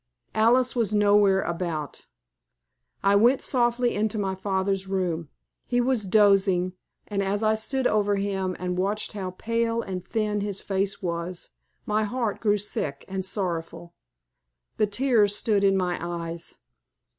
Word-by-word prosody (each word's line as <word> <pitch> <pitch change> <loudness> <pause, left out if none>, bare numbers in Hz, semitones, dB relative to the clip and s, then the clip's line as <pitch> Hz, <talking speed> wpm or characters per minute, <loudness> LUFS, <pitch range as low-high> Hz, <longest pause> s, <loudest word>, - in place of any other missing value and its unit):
Alice 245 +4 +3
was 220 -3 +1
nowhere 205 -2 +4
about. 165 -4 -4 1.0
I 200 0 +4
went 240 +6 +4
softly 240 -1 +1
into 215 +1 -1
my 195 -2 -1
father's 190 0 -1
room. 175 -5 -2 0.4
He 245 - +1
was 245 -4 +1
dozing, 195 -3 +4 0.3
and 200 -1 -1
as 200 +2 -1
I 215 0 +4
stood 250 +5 -1
over 205 -3 +2
him 195 -2 -2
and 180 0 -3
saw 200 +3 +1 0.2
how 195 -3 -4
pale 230 0 0
and 185 -2 -5
thin 210 +1 -1
his 200 -1 -3
face 195 0 -2
was, 170 0 -4 0.3
my 215 +1 +1
heart 225 0 -2
grew 210 -2 +2
sick 150 -8 -4
and 190 0 -3
sorrowful. 170 -3 -4 0.8
The 215 - +3
tears 210 -2 +2
stood 205 -2 +1
in 195 -1 +4
my 180 -1 -1
eyes. 170 -1 -5
200 Hz, 145 wpm, -26 LUFS, 185-215 Hz, 1.0 s, nowhere